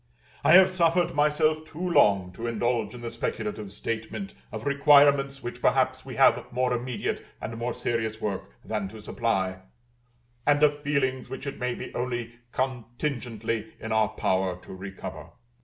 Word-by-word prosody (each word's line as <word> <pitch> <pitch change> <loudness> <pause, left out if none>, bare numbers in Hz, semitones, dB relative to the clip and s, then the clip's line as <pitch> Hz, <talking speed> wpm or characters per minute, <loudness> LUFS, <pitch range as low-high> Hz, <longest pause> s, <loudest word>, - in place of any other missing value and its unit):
I - - +6
have 190 +1 +8
suffered 175 -1 +2
myself 155 +1 +2
too 160 +3 -5
long 100 - +4
to 115 +6 -5
indulge 115 -1 0
in 120 - -9
the 115 -1 -5
speculative 105 -2 -3
statement 115 - -4 0.2
of - - -6
requirements 140 -1 +5
which 120 - -6
perhaps - - +2
we - - -8
have - - +4
more 125 0 +1
immediate 125 0 -2 0.2
and 115 - -5
more 120 +1 -3
serious 110 -2 -2
work 100 -2 -3 0.2
than 105 -3 -2
to 110 +3 -10
supply, 95 -4 -1 0.8
and 145 +2 +3
of 145 0 +4
feelings 135 -3 0
which 135 - -6
it 140 - -5
may 125 0 -1
be - - -7
only 120 -1 -3 0.2
contingently 120 -3 -3
in 110 - -6
our 110 -1 +3
power 95 -4 0
to - - -10
recover. 95 0 -8
120 Hz, 155 wpm, -27 LUFS, 110-140 Hz, 0.8 s, have